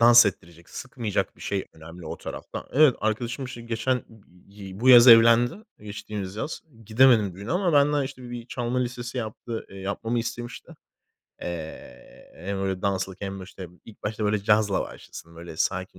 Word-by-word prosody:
dans 120 Hz, 0 st, +8 dB
ettirecek, 85 Hz, -3 st, -6 dB
sıkmayacak 120 Hz, -5 st, -3 dB
bir -, -, -20 dB
şey 100 Hz, -1 st, -2 dB
önemli 80 Hz, +1 st, -11 dB
o -, -, -5 dB
tarafta. -, -, -7 dB
Evet 145 Hz, -2 st, +6 dB
arkadaşım, 120 Hz, +4 st, -2 dB
işte, 125 Hz, -2 st, -8 dB
geçen, 120 Hz, +2 st, -1 dB, 0.5 s
eee, 100 Hz, -1 st, -10 dB
bu 130 Hz, -, +2 dB
yaz 125 Hz, -1 st, +10 dB
evlendi 115 Hz, +1 st, +7 dB, 0.3 s
geçtiğimiz 105 Hz, -2 st, -6 dB
yaz. 150 Hz, -, -4 dB, 0.2 s
Gidemedim 110 Hz, -4 st, +4 dB
düğüne 100 Hz, +4 st, -8 dB
ama 180 Hz, -1 st, +1 dB
benden, 145 Hz, 0 st, +4 dB
işte, 130 Hz, -2 st, -7 dB
bir 120 Hz, -1 st, -7 dB
çalma 125 Hz, 0 st, -2 dB
listesi 125 Hz, 0 st, -3 dB
yaptı, 115 Hz, 0 st, -5 dB
eee, 95 Hz, -, -11 dB
yapmamı 105 Hz, +5 st, -2 dB
istemişti. 120 Hz, +1 st, -6 dB, 0.7 s
Eee, 80 Hz, -7 st, -8 dB
hem 95 Hz, +1 st, -4 dB
öyle 95 Hz, -1 st, -2 dB
danslık 95 Hz, -1 st, -2 dB
hem 95 Hz, -1 st, -5 dB
de, -, -, -7 dB
işte, 95 Hz, -1 st, -10 dB, 0.2 s
ilk 110 Hz, -, -15 dB
başta 110 Hz, +1 st, -3 dB
böyle 105 Hz, +1 st, +2 dB
cazla 105 Hz, -2 st, +3 dB
başlasın. 85 Hz, 0 st, -9 dB
Böyle 85 Hz, -1 st, -9 dB
sakin 95 Hz, +1 st, -2 dB
110 Hz, 165 wpm, -25 LUFS, 95-120 Hz, 0.7 s, yaz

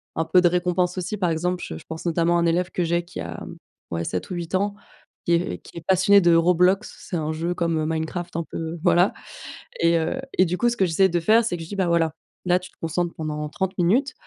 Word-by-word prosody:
un 160 Hz, -, 0 dB
peu 180 Hz, +2 st, +4 dB
de 175 Hz, -, +5 dB
récompense 180 Hz, +1 st, 0 dB
aussi, 185 Hz, +4 st, -3 dB
par 180 Hz, -3 st, +1 dB
exemple, 175 Hz, +2 st, -1 dB
je 80 Hz, -, -6 dB
je -, -, -13 dB
pense 160 Hz, +2 st, -7 dB
notamment 170 Hz, 0 st, +2 dB
à -, -, +1 dB
un 170 Hz, -, +2 dB
élève 180 Hz, +2 st, 0 dB
que 180 Hz, -, -1 dB
j'ai 170 Hz, +1 st, 0 dB
qui 185 Hz, -, -9 dB
a, 85 Hz, -1 st, -5 dB
hem, -, -, -9 dB, 0.3 s
ouais 85 Hz, 0 st, -2 dB
7 90 Hz, +2 st, -3 dB
ou -, -, -2 dB
8 170 Hz, +1 st, -3 dB
ans, 200 Hz, +2 st, +1 dB, 0.5 s
qui 170 Hz, -, +2 dB
est 170 Hz, +2 st, 0 dB
qui -, -, -14 dB
est 165 Hz, -, -7 dB
passionné 190 Hz, +2 st, +5 dB
de 175 Hz, -1 st, +4 dB
Roblox, 180 Hz, +4 st, +3 dB
c'est 175 Hz, -, -5 dB
un 155 Hz, 0 st, -2 dB
jeu 165 Hz, +3 st, -2 dB
comme, 170 Hz, -2 st, 0 dB
heu, 155 Hz, -, 0 dB
Minecraft 160 Hz, +2 st, -3 dB
un 170 Hz, -, -1 dB
peu, 165 Hz, +1 st, -5 dB
voilà 180 Hz, +1 st, +4 dB, 0.7 s
et 170 Hz, 0 st, +4 dB
heu 165 Hz, +11 st, -1 dB, 0.2 s
et 185 Hz, -, +6 dB
du 180 Hz, +1 st, -2 dB
coup 240 Hz, -, +2 dB
ce 235 Hz, -, -3 dB
que 190 Hz, -, +3 dB
j'essaie 190 Hz, +3 st, +3 dB
de 175 Hz, 0 st, +1 dB
faire, 220 Hz, +7 st, +4 dB
c'est 180 Hz, -6 st, -2 dB
que 165 Hz, -, -7 dB
je 160 Hz, -, -10 dB
dis: 200 Hz, -, -6 dB
«Bah 190 Hz, -3 st, +1 dB
voilà, 165 Hz, -2 st, +2 dB, 0.3 s
là 180 Hz, 0 st, +4 dB
tu 185 Hz, -, -11 dB
te -, -, -31 dB
concentres 170 Hz, +1 st, -1 dB
pendant 150 Hz, -1 st, -4 dB
30 190 Hz, +3 st, -3 dB
minutes 245 Hz, +11 st, +2 dB
175 Hz, 265 wpm, -23 LUFS, 165-185 Hz, 0.7 s, et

